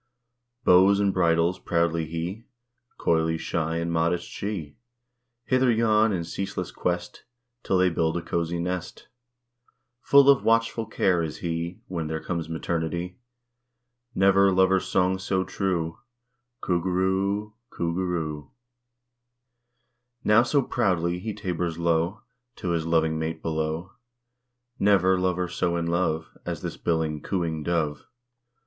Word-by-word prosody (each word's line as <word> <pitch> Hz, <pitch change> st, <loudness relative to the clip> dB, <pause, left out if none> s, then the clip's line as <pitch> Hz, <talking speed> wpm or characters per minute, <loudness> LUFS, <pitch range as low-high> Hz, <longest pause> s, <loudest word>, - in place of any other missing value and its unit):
_" -, -, -36 dB
Bows 95 Hz, +3 st, +6 dB
and 100 Hz, -1 st, +2 dB
bridles 85 Hz, 0 st, +2 dB
proudly 85 Hz, -1 st, 0 dB
he, 85 Hz, +8 st, -5 dB, 0.5 s
Coyly 80 Hz, 0 st, +1 dB
shy 80 Hz, 0 st, -2 dB
and 85 Hz, 0 st, -2 dB
modest 85 Hz, +1 st, 0 dB
she; 95 Hz, -8 st, -5 dB, 0.7 s
Hither, 130 Hz, 0 st, +3 dB
yon, 110 Hz, -1 st, +3 dB
in 90 Hz, -4 st, -1 dB
ceaseless 95 Hz, +1 st, -4 dB
quest, 90 Hz, 0 st, -3 dB, 0.4 s
'Till 95 Hz, -, +1 dB
they 90 Hz, 0 st, +3 dB
build 80 Hz, 0 st, 0 dB
a 85 Hz, -, -4 dB
cozy 85 Hz, 0 st, -2 dB
nest; 90 Hz, +1 st, -4 dB, 0.9 s
Full 140 Hz, -1 st, +6 dB
of 140 Hz, -2 st, +6 dB
watchful 115 Hz, 0 st, +1 dB
care 95 Hz, -5 st, +1 dB
is 80 Hz, -2 st, -4 dB
he, 85 Hz, +1 st, -4 dB
When 85 Hz, -4 st, -3 dB
there 80 Hz, 0 st, -3 dB
comes 85 Hz, -1 st, -4 dB
maternity; 85 Hz, +2 st, -3 dB, 1.0 s
Never 100 Hz, +1 st, +5 dB
lover's 95 Hz, 0 st, +3 dB
song 95 Hz, +1 st, +1 dB
so 95 Hz, -1 st, 0 dB
true 85 Hz, -4 st, -2 dB, 0.6 s
"Coo 90 Hz, -2 st, 0 dB
goo 95 Hz, -, -2 dB
roo 95 Hz, +2 st, +1 dB
o 105 Hz, -, -4 dB
o, -, -, -32 dB, 0.2 s
Coo 85 Hz, -1 st, -2 dB
goo 95 Hz, +2 st, -1 dB
roo 85 Hz, -4 st, -2 dB
o -, -, -8 dB
o." -, -, -36 dB, 1.7 s
Now 105 Hz, +2 st, +5 dB
so 135 Hz, +3 st, +2 dB
proud 105 Hz, -8 st, +1 dB
he 90 Hz, +5 st, -4 dB
tabers 90 Hz, -4 st, -3 dB
low, 85 Hz, +4 st, 0 dB, 0.3 s
To 90 Hz, -, -4 dB
his 85 Hz, -1 st, -1 dB
loving 80 Hz, -1 st, +2 dB
mate 80 Hz, 0 st, -4 dB
below; 80 Hz, +2 st, -2 dB, 0.9 s
Never 95 Hz, -2 st, +4 dB
lover 90 Hz, -1 st, 0 dB
so 85 Hz, 0 st, -1 dB
in 85 Hz, -, -1 dB
love, 85 Hz, -2 st, -1 dB
As -, -, -5 dB
this -, -, -4 dB
billing, 80 Hz, -3 st, -1 dB
cooing 85 Hz, -4 st, -2 dB
dove. 75 Hz, -2 st, -1 dB
85 Hz, 140 wpm, -26 LUFS, 80-95 Hz, 1.7 s, Bows